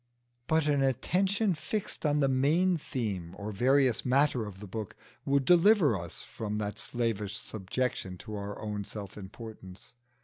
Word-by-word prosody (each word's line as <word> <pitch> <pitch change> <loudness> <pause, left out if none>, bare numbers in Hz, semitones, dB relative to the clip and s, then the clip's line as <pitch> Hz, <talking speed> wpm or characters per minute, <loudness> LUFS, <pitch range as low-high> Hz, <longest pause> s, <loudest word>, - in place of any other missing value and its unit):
But 160 -1 +3
an 145 -2 +2
attention 185 - +2
fixed 180 0 -3
on 150 0 +2
the 135 - +4
main 155 +8 +3
theme 100 - -4
or 105 +1 -4
various 130 +3 +3
matter 130 -3 +2
of 95 -2 -9
the 105 - -8
book 105 +1 -6 0.3
would 140 -1 +2
deliver 175 - +6
us 85 -3 -6
from 105 -1 -4
that 105 0 -3
slavish 115 -4 -2
subjection 95 -2 -3
to 110 - -7
our 100 0 -5
own 105 -1 -3
self 100 0 -8
importance. 105 -2 -10
120 Hz, 150 wpm, -30 LUFS, 105-145 Hz, 0.3 s, deliver